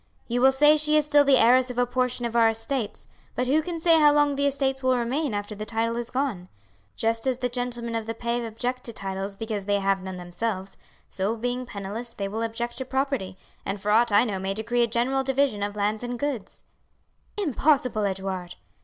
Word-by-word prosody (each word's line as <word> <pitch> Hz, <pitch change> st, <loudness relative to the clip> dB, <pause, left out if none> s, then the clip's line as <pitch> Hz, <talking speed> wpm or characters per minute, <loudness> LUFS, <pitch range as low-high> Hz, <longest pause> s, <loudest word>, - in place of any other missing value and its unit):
You 245 Hz, +1 st, 0 dB
will 265 Hz, +1 st, +7 dB
say 295 Hz, +3 st, +5 dB
she 305 Hz, 0 st, +4 dB
is 305 Hz, -, +2 dB
still 295 Hz, -1 st, +5 dB
the 275 Hz, -2 st, +5 dB
heiress 255 Hz, +2 st, +5 dB
of 250 Hz, -, -6 dB
a 245 Hz, -, +3 dB
portion 250 Hz, 0 st, -1 dB
of 235 Hz, 0 st, -4 dB
our 230 Hz, -1 st, +5 dB
estates, 225 Hz, +1 st, -3 dB, 0.3 s
but 250 Hz, -, 0 dB
who 290 Hz, +5 st, +3 dB
can 335 Hz, +1 st, -5 dB
say 330 Hz, 0 st, +5 dB
how 300 Hz, -1 st, +7 dB
long 290 Hz, -1 st, +3 dB
the 280 Hz, +1 st, +1 dB
estates 270 Hz, -1 st, -1 dB
will 255 Hz, -1 st, +2 dB
remain 250 Hz, +1 st, -1 dB
after 205 Hz, +1 st, -4 dB
the 210 Hz, 0 st, -6 dB
title 230 Hz, +2 st, -1 dB
is 235 Hz, 0 st, -4 dB
gone? 250 Hz, -10 st, -2 dB, 0.5 s
Just 225 Hz, +2 st, 0 dB
as 255 Hz, -2 st, +1 dB
the 250 Hz, -, -1 dB
gentlemen 240 Hz, -1 st, -3 dB
of 225 Hz, -1 st, -3 dB
the 225 Hz, -, -3 dB
pave 235 Hz, +1 st, -2 dB
object 245 Hz, +3 st, -3 dB
to 235 Hz, -, -6 dB
titles 195 Hz, 0 st, -4 dB
because 215 Hz, -2 st, -4 dB
they 205 Hz, 0 st, +2 dB
have 195 Hz, -1 st, +1 dB
none 190 Hz, -1 st, -6 dB
themselves, 190 Hz, +2 st, -4 dB, 0.3 s
so 200 Hz, +4 st, -2 dB
being 245 Hz, +2 st, -3 dB
penniless 215 Hz, +3 st, -6 dB
they 200 Hz, -, -3 dB
will 215 Hz, +3 st, -4 dB
object 235 Hz, +2 st, -3 dB
to 260 Hz, -, -3 dB
property, 265 Hz, -8 st, -2 dB, 0.3 s
and 200 Hz, +1 st, -3 dB
for 210 Hz, +2 st, -1 dB
aught 230 Hz, +2 st, +4 dB
I 205 Hz, +2 st, +6 dB
know 205 Hz, -6 st, -2 dB
may 190 Hz, +1 st, -2 dB
decree 235 Hz, +3 st, 0 dB
a 235 Hz, -, +3 dB
general 245 Hz, +4 st, 0 dB
division 270 Hz, -5 st, +1 dB
of 205 Hz, 0 st, -2 dB
lands 210 Hz, +2 st, -1 dB
and 245 Hz, 0 st, -3 dB
goods." 270 Hz, -6 st, -4 dB, 0.7 s
"Impossible, 275 Hz, -, +2 dB
Edouard!" 190 Hz, -2 st, -3 dB
235 Hz, 215 wpm, -25 LUFS, 210-265 Hz, 0.7 s, will